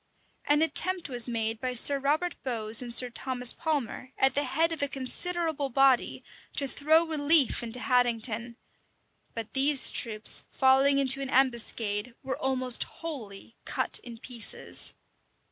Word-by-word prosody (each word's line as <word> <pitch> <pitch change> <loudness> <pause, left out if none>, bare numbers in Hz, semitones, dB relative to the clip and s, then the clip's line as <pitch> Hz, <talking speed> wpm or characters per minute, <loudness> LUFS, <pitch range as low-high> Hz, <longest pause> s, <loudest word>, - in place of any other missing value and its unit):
An 295 +2 +2
attempt 350 0 0
was 245 -2 +1
made 225 -1 -3
by 255 -1 -3
Sir 275 +3 +5
Robert 305 +6 -1
Bowes 225 -3 +1
and 245 -1 -7
Sir 245 +1 +4
Thomas 250 0 +1
Palmer, 280 -4 -4
at 265 - +2
the 285 +1 -1
head 320 +6 0
of 325 - -5
a 285 - 0
considerable 300 +2 -2
body, 270 -1 +1 0.3
to 280 - 0
throw 315 +6 +1
relief 310 -3 +2
into 235 +1 -5
Haddington; 240 -2 -1 0.8
but 225 -2 -7
these 275 0 +3
troops, 215 -2 +1
falling 270 +1 +3
into 275 0 +2
an 270 - -5
ambuscade, 235 -4 -1
were 265 0 -5
almost 255 -2 +2
wholly 230 -10 -10
cut - - 0
in 235 -2 -11
pieces. 235 -1 -3
260 Hz, 145 wpm, -27 LUFS, 235-285 Hz, 0.8 s, Sir